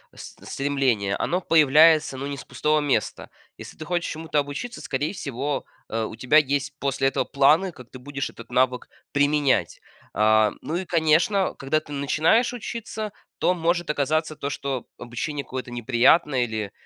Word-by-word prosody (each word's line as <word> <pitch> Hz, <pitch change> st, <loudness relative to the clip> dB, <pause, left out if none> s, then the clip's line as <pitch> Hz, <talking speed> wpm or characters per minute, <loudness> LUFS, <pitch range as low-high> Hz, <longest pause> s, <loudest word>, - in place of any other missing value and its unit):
с -, -, -10 dB, 0.2 s
стремление, 130 Hz, -8 st, 0 dB
оно 180 Hz, +2 st, -1 dB
появляется, 155 Hz, -2 st, +5 dB
ну, 135 Hz, -, -5 dB
не 140 Hz, 0 st, -4 dB
с -, -, -8 dB
пустого 150 Hz, +5 st, 0 dB
места. 145 Hz, -2 st, -1 dB, 0.3 s
Если -, -, -11 dB
ты 155 Hz, -, -7 dB
хочешь 175 Hz, 0 st, -1 dB
чему-то 160 Hz, -1 st, -1 dB
обучиться, 145 Hz, -, -5 dB
скорее 145 Hz, +8 st, -2 dB
всего, 140 Hz, -3 st, -3 dB, 0.2 s
э, 115 Hz, 0 st, -1 dB
у 110 Hz, -, -7 dB
тебя 130 Hz, +6 st, +3 dB
есть 145 Hz, -1 st, +1 dB
после 135 Hz, -1 st, 0 dB
этого -, -, -1 dB
планы, 150 Hz, +7 st, +3 dB
как 125 Hz, -5 st, -15 dB
ты 130 Hz, -, -10 dB
будешь 140 Hz, +1 st, -5 dB
этот 115 Hz, -, -13 dB
навык 125 Hz, 0 st, +1 dB, 0.2 s
применять. 145 Hz, -1 st, +1 dB, 0.3 s
А, 110 Hz, 0 st, +3 dB
ну, 160 Hz, -, -4 dB
и 185 Hz, +1 st, -2 dB
конечно, 170 Hz, +4 st, +2 dB
когда 135 Hz, +3 st, +1 dB
ты 150 Hz, -, -15 dB
начинаешь 155 Hz, -, +2 dB
учиться, 220 Hz, -2 st, -5 dB, 0.3 s
то 180 Hz, -, +2 dB
может 170 Hz, 0 st, -1 dB
оказаться 155 Hz, +2 st, -1 dB
то, 140 Hz, -, -4 dB
что 135 Hz, -4 st, -4 dB
обучение 120 Hz, +5 st, -4 dB
какое-то 130 Hz, -1 st, -6 dB
неприятное 125 Hz, +3 st, +3 dB
или, 110 Hz, -3 st, -4 dB
145 Hz, 165 wpm, -24 LUFS, 130-160 Hz, 0.3 s, появляется